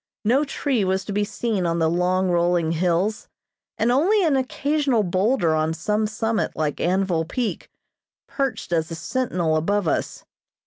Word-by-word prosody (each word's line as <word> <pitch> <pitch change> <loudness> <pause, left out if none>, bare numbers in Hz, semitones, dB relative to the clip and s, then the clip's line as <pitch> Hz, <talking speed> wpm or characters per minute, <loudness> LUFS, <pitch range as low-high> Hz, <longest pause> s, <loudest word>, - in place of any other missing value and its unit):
No 255 +7 +3
tree 275 -5 -1
was 190 0 0
to 205 - -4
be 205 +1 +1
seen 205 -3 -2
on 170 0 0
the 165 -1 +2
long, 180 +2 +1
rolling 175 -1 +2
hills, 180 +5 0 0.5
and 230 +2 +2
only 370 - +3
an 310 -5 +3
occasional 270 -2 0
boulder 185 0 +1
on 155 +1 0
some 210 +6 0
summit 220 0 -2
like 150 -2 -2
Anvil 180 -2 +1
Peak, 230 +7 -3 0.6
perched 270 -10 -3
as 160 -1 0
a 165 - -5
sentinel 175 -4 -1
above 200 +4 0
us. - - -2
195 Hz, 160 wpm, -23 LUFS, 170-240 Hz, 0.6 s, No